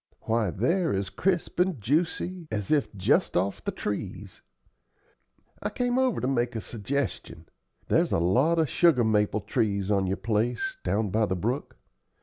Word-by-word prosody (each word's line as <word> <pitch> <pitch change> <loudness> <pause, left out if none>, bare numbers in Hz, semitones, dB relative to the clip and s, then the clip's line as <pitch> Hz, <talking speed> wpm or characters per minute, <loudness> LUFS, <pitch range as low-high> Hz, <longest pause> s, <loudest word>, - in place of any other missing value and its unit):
Why, 110 -3 0
they're 160 - +1
as 95 0 -2
crisp 180 -3 -1
and 180 -6 +2
juicy 165 - -1
as 105 -5 -3
if 150 -3 +2
just 95 - +2
off 95 +2 -1
the - - -2
trees. 100 -1 -5 1.2
I - - -1
came 245 +1 0
over 260 -3 +2
to 125 - -1
make 120 -2 0
a - - -1
suggestion. 110 - -4 0.4
There's - - +2
a - - +3
lot 125 - +3
of 160 -2 +3
sugar 150 -3 +4
maple 105 -1 +2
trees 100 -1 0
on 100 -2 +2
your 95 +2 -1
place, 115 - -1
down 105 -2 0
by 110 +1 +2
the 95 - -1
brook. 120 +9 -3
115 Hz, 160 wpm, -27 LUFS, 100-160 Hz, 1.2 s, sugar